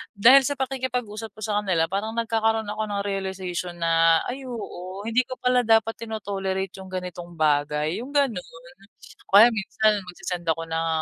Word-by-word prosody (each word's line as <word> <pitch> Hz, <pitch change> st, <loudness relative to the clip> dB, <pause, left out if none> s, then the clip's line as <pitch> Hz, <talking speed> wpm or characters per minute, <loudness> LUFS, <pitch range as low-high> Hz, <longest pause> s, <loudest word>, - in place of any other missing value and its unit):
dahil 255 Hz, +7 st, +7 dB
sa 285 Hz, -, -1 dB
pakikipag-usap 250 Hz, -5 st, -3 dB
ko 215 Hz, -, -13 dB
sa 210 Hz, -1 st, 0 dB
kanila 185 Hz, -5 st, +1 dB
parang 210 Hz, +3 st, -2 dB
nagkakaroon 225 Hz, -1 st, +1 dB
ako 215 Hz, +1 st, -3 dB
ng 200 Hz, -1 st, -1 dB
realization 190 Hz, -3 st, -3 dB
na, 165 Hz, 0 st, +4 dB
"Ay 265 Hz, +2 st, -6 dB
oo, 200 Hz, -5 st, -7 dB
hindi 235 Hz, +2 st, +2 dB
ko 255 Hz, -, -5 dB
pala 250 Hz, 0 st, +3 dB
dapat 225 Hz, 0 st, +3 dB
tino-tolerate 195 Hz, -4 st, -3 dB
yung 190 Hz, -, -9 dB
ganitong 180 Hz, -1 st, -6 dB
bagay," 150 Hz, +3 st, +1 dB
yung 270 Hz, +4 st, -9 dB
ganun. 265 Hz, -10 st, +2 dB, 0.9 s
O -, -, +7 dB
kaya 235 Hz, -, +8 dB
minsan, 210 Hz, 0 st, +1 dB
magse-send 180 Hz, -1 st, -6 dB
ako 165 Hz, 0 st, 0 dB
ng 165 Hz, 0 st, -1 dB
205 Hz, 165 wpm, -24 LUFS, 180-225 Hz, 0.9 s, kaya